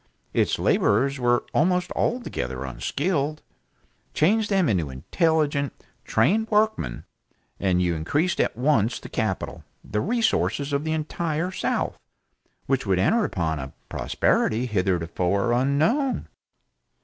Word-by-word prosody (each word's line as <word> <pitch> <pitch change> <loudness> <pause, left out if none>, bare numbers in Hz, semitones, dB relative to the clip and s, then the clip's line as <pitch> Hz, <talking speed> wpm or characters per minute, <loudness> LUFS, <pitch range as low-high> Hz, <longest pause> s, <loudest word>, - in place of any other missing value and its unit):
Its - - +2
laborers 135 +6 +2
were 120 0 +2
almost 180 +2 +2
altogether 70 - -2
unskilled. 145 - -2 0.7
Change 210 +7 +3
them 195 -5 +2
into 90 - 0
intelligent, 145 - 0 0.3
trained 220 +3 +2
workmen, 210 - +1 0.6
and 90 -2 +2
you 85 -1 +1
increased 145 - 0
at - - -1
once 125 -4 +2
the - - -10
capital, - - -3 0.2
the 105 - -2
resources 205 - 0
of 140 +1 0
the 160 - -2
entire 160 +2 -2
south, - - -2 0.7
which 135 -5 0
would 95 -2 +2
enter 220 - +3
upon 80 -5 -2
a 65 0 -7 0.2
prosperity 115 +3 +1
hitherto 90 -6 -1 0.3
unknown. 155 - +1
140 Hz, 115 wpm, -25 LUFS, -, 0.7 s, Change